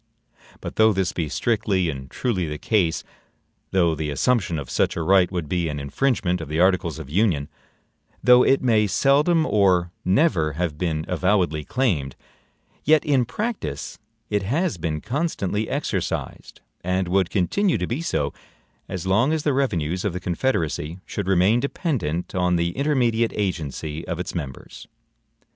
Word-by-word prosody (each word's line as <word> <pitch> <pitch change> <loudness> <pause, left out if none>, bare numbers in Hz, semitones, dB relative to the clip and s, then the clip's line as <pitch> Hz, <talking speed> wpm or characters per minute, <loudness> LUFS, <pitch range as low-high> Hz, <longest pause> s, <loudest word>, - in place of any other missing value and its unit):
But - - -7
though 110 0 +5
this 95 -1 0
be 80 -3 -2
strictly 100 -4 0
and 65 -4 -5
truly 100 -9 -1
the 75 0 -4
case; 90 -2 +1 0.7
though 85 -4 +2
the 80 -1 -3
assumption 85 - +1
of 70 -4 -5
such - - 0
a 85 - -2
right 95 0 +4
would 85 -5 -3
be 85 0 -1
an 75 -1 -4
infringement 90 - 0
of 80 - -7
the 80 +2 -1
articles 90 -3 +2
of 80 -4 -8
Union; 80 -3 +1 0.8
though 125 0 +7
it 135 +1 +3
may 110 -4 +3
seldom 150 - +3
or 90 - +2
never 90 - +2
have 80 -1 -3
been 80 -3 -1
avowedly 90 -3 +1
claimed, 80 - -1 0.7
yet 155 0 +4
in 135 -4 +3
practice 205 - -4 0.3
it 105 -1 +1
has 125 - -1
been 80 -2 -2
constantly 120 - -2
exercised, 90 - -3 0.2
and 90 +1 0
would 95 0 +2
continue 175 - +1
to - - -2
be 125 +7 -3
so, 75 - -1 0.6
as 95 -2 -4
long 105 +9 +3
as 160 -2 0
the 145 - +2
revenues 90 - 0
of 100 - -1
the 90 - -3
Confederacy 85 - -1
should 100 -3 -4
remain 95 +5 +4
dependent 120 - -2
on 90 -1 +1
the 85 0 0
intermediate 120 - +1
agency 80 -5 -3
of 85 -2 -3
its 90 - -4
members. 70 -7 -7
90 Hz, 155 wpm, -23 LUFS, 80-120 Hz, 0.8 s, though